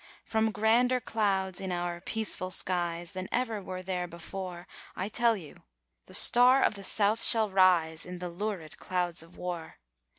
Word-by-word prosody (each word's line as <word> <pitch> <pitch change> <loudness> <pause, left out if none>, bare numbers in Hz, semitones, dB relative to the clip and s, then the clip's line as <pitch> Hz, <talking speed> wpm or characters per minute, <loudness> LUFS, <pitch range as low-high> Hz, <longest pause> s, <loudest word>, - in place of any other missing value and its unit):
From 220 0 +1
grander 235 +4 +2
clouds 195 -5 -1
in 190 -1 -4
our 175 -1 -3
'peaceful 210 -3 -3
skies' 175 -2 -2
than 185 -1 -6
ever 230 -4 -1
were 185 -1 -7
there 180 -1 -3
before 175 +1 -7 0.3
I 190 +3 -3
tell 230 0 +2
you 160 -6 -11 0.5
the - - -6
Star 250 +2 +7
of - - +2
the 200 -1 -9
South 210 +3 +1
shall 220 -3 +4
rise 175 -4 +3
in 180 0 -8
the 180 0 -5
lurid 180 -3 -5
clouds 180 -2 -1
of 165 +2 -15
war. 175 -2 -6
185 Hz, 165 wpm, -29 LUFS, 175-220 Hz, 0.5 s, Star